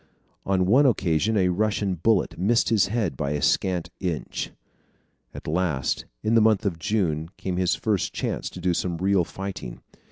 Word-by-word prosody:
On 95 -1 +2
one 130 +9 +5
occasion 100 -2 +1
a 90 -2 +3
Russian 100 +1 0
bullet 95 +4 +1
missed 115 +6 +2
his 105 -3 +3
head 100 - -1
by 70 +2 -2
a 75 - -1
scant 90 -3 +1
inch. 85 -8 -3 0.8
At - - -10
last, 80 -6 -1 0.2
in 110 - +1
the 115 - +6
month 110 -1 +3
of 85 -5 -1
June, 85 -5 -1
came 90 -2 -3
his 90 -1 +2
first 105 -4 -1
chance - - -3
to - - -10
do 90 0 +1
some 85 0 -2
real 95 +1 +2
fighting. 90 -10 -7
95 Hz, 170 wpm, -25 LUFS, 85-105 Hz, 0.8 s, the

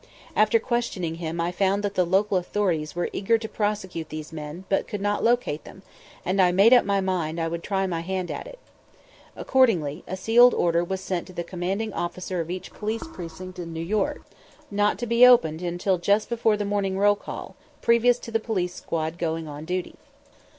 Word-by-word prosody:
After - - +4
questioning 235 - -2
him 165 0 -3
I 170 +1 0
found 195 +2 +1
that 200 -1 -1
the 185 -3 +2
local 190 +1 +2
authorities 175 -5 -1
were 175 - -2
eager 225 +4 +2
to 220 0 -6
prosecute 200 -7 -3
these 155 +1 -7
men, 155 +3 -7
but 195 - 0
could 210 - -4
not 205 +1 -1
locate 235 -11 +1
them; 190 - -13 0.4
and 190 +2 +2
I 180 -1 +5
made 200 +7 +6
up 250 - +6
my 200 0 +1
mind 170 -4 -1
I 165 - 0
would 170 +1 -4
try 195 +1 -1
my 175 -3 -2
hand 185 +1 -3
at - - -6
it. - - -11 0.8
Accordingly, 180 - +2
a 185 - -4
sealed 235 +5 +6
order 170 0 +2
was 190 +2 -3
sent 185 -2 -3
to 185 - -12
the 175 - -3
commanding 190 +5 -3
officer 175 +1 -3
of 165 - -6
each 180 +1 -6
police 220 +1 -3
precinct 180 +1 -8
in 165 -1 -6
New 160 - -5
York, 205 +2 -1 0.5
not 205 +1 +2
to 240 - -3
be 235 +1 +4
opened 170 -11 +6
until 175 +1 0
just 200 +4 +2
before 225 -2 +2
the 205 - -2
morning 200 -2 -1
roll 205 +1 +5
call, - - -8 0.3
previous 235 +1 +4
to 230 - -8
the 225 - +1
police 185 -6 -2
squad 160 -1 -4
going 165 -1 -2
on 150 +1 -7
duty. 180 +1 -3
190 Hz, 200 wpm, -25 LUFS, 170-210 Hz, 0.8 s, made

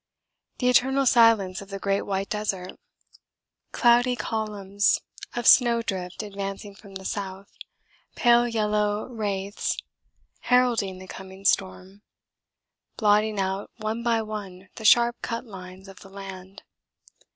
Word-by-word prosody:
The 250 - 0
eternal 265 +2 +3
silence 225 -7 +4
of 200 - -12
the 195 - -5
great 195 0 0
white 195 0 -3
desert. 195 -3 -3 1.0
Cloudy 245 +1 +4
columns 205 -4 0 0.4
of 240 -1 -3
snow 235 -2 +6
drift 185 -1 -4
advancing 200 0 -6
from 195 0 -15
the 190 0 -8
south, 195 -1 -5 0.6
pale 240 0 +4
yellow 210 -2 0
wraiths, 205 -4 -3 0.6
heralding 240 -7 +2
the 185 0 -11
coming 190 +1 -11
storm, 190 +1 0 1.0
blotting 210 -1 +2
out 190 +1 -2
one 220 +1 -3
by 230 -1 +1
one 195 -3 -8
the 220 - -9
sharp 240 +2 +5
cut 230 +1 -4
lines 190 -2 -11
of 195 -1 -13
the 195 - -14
land. 195 0 -10
205 Hz, 125 wpm, -25 LUFS, 195-230 Hz, 1.0 s, snow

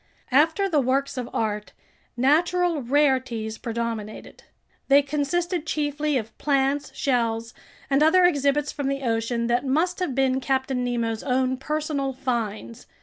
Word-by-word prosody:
After 320 +8 +3
the 320 -6 +2
works 270 +1 0
of 250 -2 -4
art, 210 -1 -2 0.4
natural 335 +5 +2
rarities 255 -5 0
predominated. 230 -2 -5 0.5
They 280 +1 +6
consisted 320 +4 -1
chiefly 295 -1 0
of 220 -2 -5
plants, 275 0 +1
shells, 230 -4 -1 0.3
and 275 +1 +2
other 355 +4 +5
exhibits 290 -3 +2
from 285 -2 -3
the 275 0 -2
ocean 230 0 -1
that 240 +2 +1
must 320 +7 0
have 355 -9 -2
been 265 0 +1
Captain 265 -1 -1
Nemo's 230 -2 -1
own 260 -1 0
personal 285 0 -2
finds. 230 - -4
270 Hz, 135 wpm, -24 LUFS, 240-295 Hz, 0.5 s, They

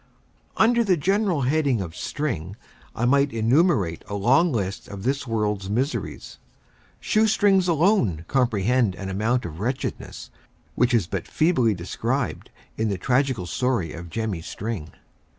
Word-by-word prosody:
Under 235 +1 +4
the 190 -5 +2
general 190 0 +1
head 145 +4 +1
of 95 -11 -1
string, 100 - -3 0.4
I 120 - 0
might 140 +2 +3
enumerate 115 - +2
a 100 - -4
long 135 - +3
list 100 -6 -3
of 100 -2 -8
this 135 +2 -1
world's 105 -4 -1
miseries. 130 +8 -3 0.6
Shoe 220 0 +2
strings 200 -3 +3
alone 160 - +2
comprehend 120 -4 +1
an 95 0 -6
amount 110 +6 0
of 80 -1 -7
wretchedness, 125 +6 -4 0.4
which 125 +1 +2
is 110 -7 +2
but 95 0 -4
feebly 130 - +2
described 85 0 -3 0.3
in 110 0 0
the 100 - -1
tragical 130 -2 0
story 90 0 -1
of 85 0 -8
Jemmy 110 -3 -3
String. 95 -2 -5
120 Hz, 140 wpm, -24 LUFS, 95-145 Hz, 0.6 s, Under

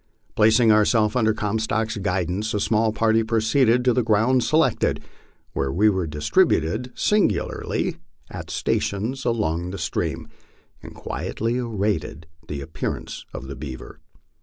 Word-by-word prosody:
Placing 110 +1 +5
ourselves 105 +1 +3
under 110 -3 +3
Comstock's 110 +1 -1
guidance, 95 +2 -1
a - - +1
small 110 +2 +2
party 110 +1 +2
proceeded 115 +2 +2
to 125 - +4
the 125 - +2
ground 115 +3 +2
selected, 155 -2 +1 0.5
where 70 0 -1
we 105 +7 +3
were 95 -4 -1
distributed 80 +9 +1
singly 200 - 0 0.3
at - - -7
stations 115 +7 -2
along 90 -7 -1
the 100 - -5
stream 80 -1 -3 0.5
and - - -11
quietly 115 +3 -3
awaited 100 -8 -2 0.2
the 70 -2 -5
appearance 80 +2 -5
of - - -7
the - - -7
beaver. 65 -2 -8
110 Hz, 130 wpm, -23 LUFS, 90-115 Hz, 0.5 s, Placing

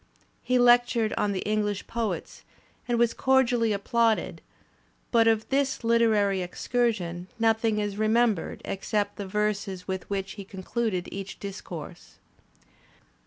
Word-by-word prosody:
He 255 - +1
lectured 240 -2 +4
on 205 - 0
the 190 - -3
Eng 215 0 +1
lish 205 -1 -3
poets 230 -2 -4 0.5
and 240 -1 +1
was 235 -1 +3
cordially 250 -4 +2
applauded, 225 +2 +1 0.7
but 230 -1 +4
of 220 -1 +2
this 275 -1 +1
Kteraiy 220 -5 +2
excursion 180 -3 -1
nothing 225 -1 +2
is 205 -1 -2
remembered 215 -3 +1
except 205 +1 -2
the 200 - -5
verses 205 -2 -2
with 190 -1 -4
which 195 -1 -2
he 200 0 -8
concluded 190 0 -3
each 195 0 -7
discourse. 180 -4 -8
215 Hz, 125 wpm, -27 LUFS, 195-235 Hz, 0.7 s, lectured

